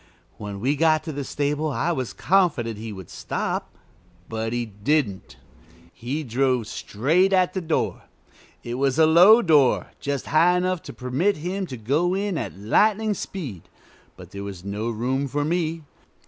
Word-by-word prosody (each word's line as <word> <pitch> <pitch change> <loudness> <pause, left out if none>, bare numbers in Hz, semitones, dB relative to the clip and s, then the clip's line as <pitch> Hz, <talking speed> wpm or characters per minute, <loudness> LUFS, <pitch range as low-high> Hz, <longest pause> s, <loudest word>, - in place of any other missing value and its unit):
When 100 -1 -6
we 135 +7 +1
got 155 +1 +3
to 160 - -5
the 140 -1 -4
stable 145 +3 -1
I 150 +4 -1
was 130 -7 -3
confident 150 - +1
he 110 0 -6
would 95 -4 -10
stop, - - -3 0.6
but 110 0 -3
he 120 0 -1
didn't. 105 0 -1 0.6
He 135 +7 -4
drove 125 -1 0
straight 160 - +1
at 185 -1 +3
the 190 - -2
door. 160 -2 -2 0.6
It 120 +1 -4
was 135 0 +1
a 160 - +6
low 180 +9 +7
door, 150 -7 +3
just 140 -2 -3
high 170 +4 +4
enough 180 -1 0
to - - -7
permit 135 +11 0
him 185 +4 -3
to 130 - -7
go 150 - +1
in 200 -1 -1
at 110 - -4
lightning 210 - +2
speed, 145 - -7 0.5
but - - -12
there 100 0 -7
was 95 -2 -8
no 105 +3 -3
room 130 +5 -1
for 145 +2 -1
me. 165 0 -1
145 Hz, 165 wpm, -24 LUFS, 115-170 Hz, 0.6 s, low